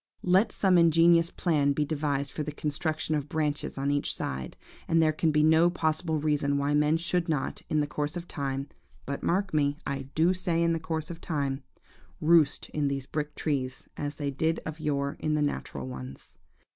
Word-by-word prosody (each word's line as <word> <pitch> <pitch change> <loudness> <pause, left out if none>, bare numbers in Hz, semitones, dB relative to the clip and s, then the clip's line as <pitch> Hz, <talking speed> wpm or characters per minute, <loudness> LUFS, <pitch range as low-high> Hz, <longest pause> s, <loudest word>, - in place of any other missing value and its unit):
Let 185 +5 +4
some 185 -3 +3
ingenious 165 0 +5
plan 150 -6 +1
be 150 +1 0
devised 140 -2 -1
for - - -4
the 150 0 -3
construction 155 +2 -2
of 145 -1 -2
branches 150 -2 -2
on 140 +1 0
each 145 0 0
side, 65 -1 -4 0.3
and 165 - +3
there 160 -1 +4
can 160 +1 +1
be 150 0 +3
no 160 +2 +5
possible 160 -1 0
reason 145 -1 +1
why 140 +1 0
men 150 +2 +3
should 170 +1 -1
not, 150 -4 -1
in 155 - +2
the - - +1
course 150 +2 -3
of 175 0 -7
time–but, 140 0 -6
mark 190 +1 0
me–I 140 -2 -1
do 165 +3 +4
say 175 -2 0
in 170 0 +2
the 165 - -1
course 160 0 -3
of 165 - -9
time–roost 145 +1 0
in 150 -2 0
these 135 -1 -2
brick 150 +1 -4
trees, 135 -4 -2
as 145 0 -4
they 145 -1 -2
did 160 +4 0
of 160 0 -6
yore 140 -2 -1
in 155 -1 0
the 150 - +1
natural 70 - -3
ones. 65 +1 -9
150 Hz, 185 wpm, -28 LUFS, 140-165 Hz, 0.3 s, ingenious